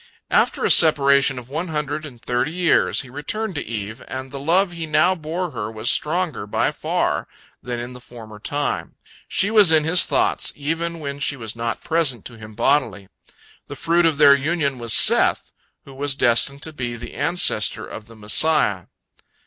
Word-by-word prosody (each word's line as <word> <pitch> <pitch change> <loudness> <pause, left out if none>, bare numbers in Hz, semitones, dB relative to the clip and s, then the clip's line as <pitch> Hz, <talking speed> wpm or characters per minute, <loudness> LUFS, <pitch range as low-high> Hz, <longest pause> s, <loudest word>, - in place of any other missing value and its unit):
After - - +1
a - - +3
separation 140 -4 +4
of 125 -1 -8
one 160 +7 -4
hundred 150 -1 -4
and 125 -5 -14
thirty 125 +4 -1
years, 175 -1 +2
he 130 - -12
returned 210 +10 -4
to 145 - -4
Eve, 110 -1 -6
and 130 0 -7
the 140 - -7
love 175 +6 +1
he 165 -2 -6
now 175 +4 +3
bore 170 +1 -5
her 110 -5 -5
was 110 +1 0
stronger 160 - -1
by - - 0
far - - -2 0.3
than 120 -1 -5
in 120 +1 -7
the 125 - -11
former 110 -4 -12
time. 145 +6 -3 0.3
She 200 +3 0
was 210 -6 +6
in 155 -1 +4
his 165 +3 +5
thoughts - - 0
even 165 +3 -3
when 140 -1 -6
she 140 0 -2
was 110 -3 -7
not 115 0 -4
present 155 -9 0
to 120 - -9
him 110 -1 -12
bodily. 115 -6 0 0.6
The - - -8
fruit 170 +1 +2
of 155 -3 0
their 145 -1 +7
reunion 140 -1 0
was 115 -1 +1
Seth, - - +3 0.3
who 135 - -13
was 140 +1 -2
destined 135 +3 +2
to 160 - -6
be 120 -4 -4
the 120 +1 -9
ancestor 175 - +1
of 110 - -10
the 115 - -15
Messiah. 105 - +2
140 Hz, 185 wpm, -21 LUFS, 120-160 Hz, 0.6 s, their